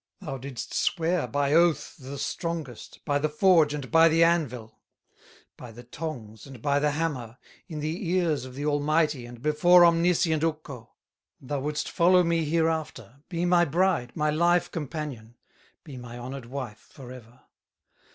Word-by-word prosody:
Thou 145 -9 -6
didst 130 -2 -7
swear 170 -4 0
by 140 +4 0
oath 170 0 +2
the 135 +1 -8
strongest, 160 -6 -5
By 145 0 +1
the 155 +1 0
forge 160 -1 +4
and 140 -3 -7
by 165 0 +6
the 165 +1 +4
anvil, 125 -10 -1 0.8
By 125 - -10
the 120 +2 -12
tongs 120 -5 -8
and 135 -3 -11
by 140 +4 +1
the 150 +1 +1
hammer, 145 -6 -3 0.3
In 155 -3 -6
the 165 +4 -3
ears 170 -7 +1
of 130 -1 -10
the 145 +2 -4
Almighty, 150 -2 0
And 120 0 -12
before 175 +4 +5
omniscient 170 -1 +2
Ukko, 150 -7 -5 0.4
Thou 140 +2 -4
wouldst 150 +2 -3
follow 180 +1 +4
me 165 -1 0
hereafter, 160 -4 -2
Be 175 -1 -2
my 175 -1 +4
bride, 165 -5 0
my 150 -1 0
life 170 +3 +2
companion, 145 -7 -6 0.5
Be 145 -6 -10
my 120 -1 -9
honored 125 0 -7
wife 125 -5 -8
forever. 125 -2 -13
150 Hz, 155 wpm, -26 LUFS, 130-165 Hz, 0.8 s, by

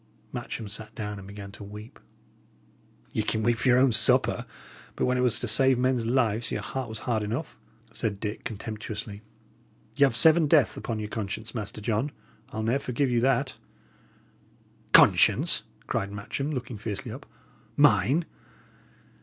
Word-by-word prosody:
Matcham 110 - -5
sat 105 +1 -7
down 105 -2 -5
and 95 - -11
began 100 0 -9
to 100 - -11
weep. 105 +2 -11 1.1
"Ye - - -1
can 110 +1 -1
weep 120 +1 +2
for - - -1
your 125 - +5
own 130 0 +4
supper, 110 0 +4 0.5
but - - 0
when 125 - +1
it 125 - +1
was 125 -3 +3
to 120 - -2
save 130 +4 +5
men's 125 -2 +1
lives, 120 -2 +1
your - - -3
heart 130 -3 -4
was 110 - -3
hard 115 -3 0
enough," 115 +9 -4 0.4
said 105 -3 -3
Dick, 105 0 -5
contemptuously. 110 -1 -6 0.7
"Y' 145 - +3
'ave 135 -4 +3
seven 160 +3 +5
deaths 145 -6 +4
upon 115 - -4
your 105 -1 -4
conscience, 110 +1 -5
Master 110 -2 -5
John; 115 +6 -1 0.4
I'll 110 0 -4
ne'er 120 +5 +1
forgive 130 0 -1
you 120 - +2
that." 135 +1 +1 1.4
"Conscience!" - - +5 0.2
cried 100 0 -2
Matcham, 105 +8 -4
looking 125 -5 -5
fiercely 110 +3 -5
up. 135 +5 -10 0.5
"Mine! 140 - +4
115 Hz, 160 wpm, -27 LUFS, 105-130 Hz, 1.4 s, your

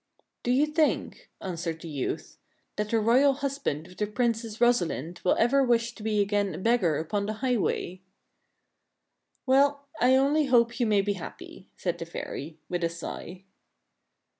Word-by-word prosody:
" - - -56
Do - - -2
you 265 +4 +4
think," 305 0 0
answered 170 -3 -4
the 170 - -8
youth, 145 -4 -4 0.2
" - - -45
that 210 0 -2
the 225 - +2
royal 255 +6 +4
hus 280 0 -3
band 155 - -2
of 180 - -15
the 210 - -1
Princess 230 -1 -1
Rosalind 175 - +1
will 180 - +3
ever 270 +4 +4
wish 235 -1 +1
to 230 - -13
be 210 -1 +1
again 200 -3 0
a - - -6
beg 230 +5 +2
gar 160 -5 +2
upon 200 +6 -2
the 215 - -1
highway? 220 -6 -1 0.5
" - - -51
" - - -49
Well, 280 +1 +3
I 255 +2 +5
only 285 +3 +3
hope 235 -2 +3
you 240 - +2
may 205 -2 +4
be 205 +1 0
happy," 185 -4 -10
said - - -2
the - - -5
fairy, 155 +3 -6
with 175 -1 -2
a 165 - +2
sigh. 170 +2 -7
220 Hz, 190 wpm, -27 LUFS, 180-255 Hz, 0.5 s, I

